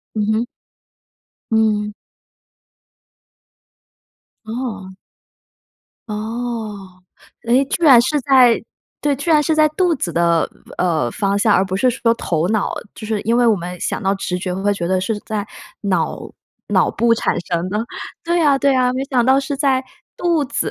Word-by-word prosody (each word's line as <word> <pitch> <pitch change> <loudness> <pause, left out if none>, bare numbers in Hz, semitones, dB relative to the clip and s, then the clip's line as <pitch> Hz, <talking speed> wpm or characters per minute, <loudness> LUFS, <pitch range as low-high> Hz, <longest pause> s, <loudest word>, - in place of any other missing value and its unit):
嗯 210 -1 0
哼。 225 +2 0 1.1
嗯。 215 -1 +1 2.5
哦。 220 -5 -5 1.2
哦。 215 -4 -5 0.4
诶， 250 +4 +4
居 345 - -3
然 265 -6 +8
是 290 +5 0
在 255 -3 +5 0.4
对， 290 -1 +1
居 285 +6 -3
然 305 -2 +5
是 315 +2 +1
在 310 0 +4
肚 350 +2 +1
子 185 - -3
的 170 0 +2 0.3
呃， 160 -9 +1
方 200 - 0
向， 205 0 +3
而 185 - +3
不 190 0 -3
是 255 +6 +2
说 235 -1 +1
头 165 -7 -1
脑， 215 -1 0 0.2
就 220 - -8
是 215 -1 -1
因 230 +2 +1
为 245 0 +3
我 225 - +5
们 180 0 -6
想 - - -2
到 195 0 +1
直 185 -2 -3
觉 180 0 -3
会 195 +2 0
觉 170 -3 -3
得 185 +1 +1
是 210 +3 -2
在 210 -1 -4 0.4
脑 185 -6 0 0.5
脑 - - +2
部 235 0 +2
产 - - 0
生 170 0 -1
的， 210 +2 -1 0.4
对 340 +1 +1
啊， 285 -3 +4
对 275 0 +3
啊， 250 -1 +2
没 260 +1 -2
想 260 -4 +1
到 265 +2 +4
是 275 +1 -4
在 270 -2 +1 0.3
肚 340 -4 +1
子。 255 - -2
225 Hz, 170 characters per minute, -19 LUFS, 195-265 Hz, 2.5 s, 然